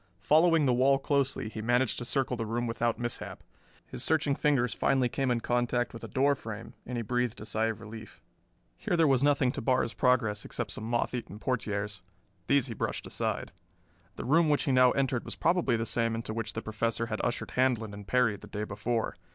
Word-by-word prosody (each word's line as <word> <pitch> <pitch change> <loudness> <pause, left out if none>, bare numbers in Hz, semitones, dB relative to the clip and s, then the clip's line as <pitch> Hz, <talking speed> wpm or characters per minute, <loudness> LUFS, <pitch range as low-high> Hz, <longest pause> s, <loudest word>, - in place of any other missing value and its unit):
Following 160 - +4
the 125 - +3
wall 135 +3 +4
closely 140 -4 0
he 110 0 -6
managed 120 +2 +1
to 120 - -5
circle 130 0 0
the 115 -2 -4
room 120 +2 -1
without 115 0 0
mishap. 120 -1 -5 0.4
His - - -5
searching 155 -3 +2
fingers 135 -5 +1
finally 130 -3 +2
came 135 +1 -1
in 120 -1 +1
contact 120 0 0
with 115 - -9
a - - -5
door 140 +1 +2
frame, 115 -4 -7
and 125 0 -3
he 115 - -2
breathed 125 +1 -1
a 105 - -8
sigh 110 +1 0
of 110 -1 -3
relief. 110 -1 -10 0.6
Here 175 - 0
there 165 - +5
was 135 -1 +3
nothing 140 -3 +3
to - - -5
bar 130 +2 +2
his 115 - -4
progress 115 -5 +2
except 115 -4 -4
some 110 - -6
moth 120 +2 0
eaten 120 -4 -5
portieres. 105 -4 -2 0.5
These 140 -3 +3
he 120 - -5
brushed - - -3
aside. - - -2 0.6
The - - -6
room 160 +5 +4
which 145 - +2
he 140 - 0
now 130 -1 +6
entered 130 -3 0
was - - -6
probably 165 -8 +2
the 115 - -2
same 115 -1 0
into 115 -1 -4
which 115 -1 -4
the - - -5
Professor 115 +1 -1
had 110 -1 -3
ushered 120 - -2
Handlon 120 -5 +1
and 100 -1 -9
Perry 125 -3 +3
the 105 - -13
day 105 +1 -4
before. 110 +2 -2
120 Hz, 215 wpm, -29 LUFS, 110-135 Hz, 0.6 s, now